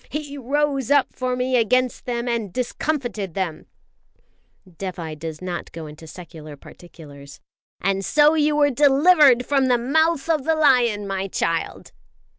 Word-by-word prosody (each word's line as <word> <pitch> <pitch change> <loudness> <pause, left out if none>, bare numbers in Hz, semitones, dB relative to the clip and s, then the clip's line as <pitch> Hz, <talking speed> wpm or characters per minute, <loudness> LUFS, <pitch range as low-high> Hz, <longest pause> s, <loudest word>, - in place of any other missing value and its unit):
He 295 -1 -6
rose 280 -1 -1
up 285 -1 +2
for 255 -1 -2
me 255 +1 -1
against 250 +2 0
them 240 0 -3
and 230 -5 -2
discomfited 245 - -3
them" 180 -5 -4 1.0
Dévai 170 -3 -7
does 160 +1 -7
not 180 -1 -5
go 165 -1 -8
into 155 +2 -12
secular 155 -3 -11
particulars 140 -4 -14 0.4
"and 195 0 -1
so 300 +7 +4
you 300 -1 +1
were 290 -1 +3
delivered 280 -1 +4
from 275 -2 +1
the 250 -1 +3
mouth 315 +5 +1
of 315 -4 0
the 320 +2 +1
lion, 245 -9 +2
my 195 0 -3
child!" 165 -3 -3
245 Hz, 145 wpm, -22 LUFS, 180-285 Hz, 1.0 s, so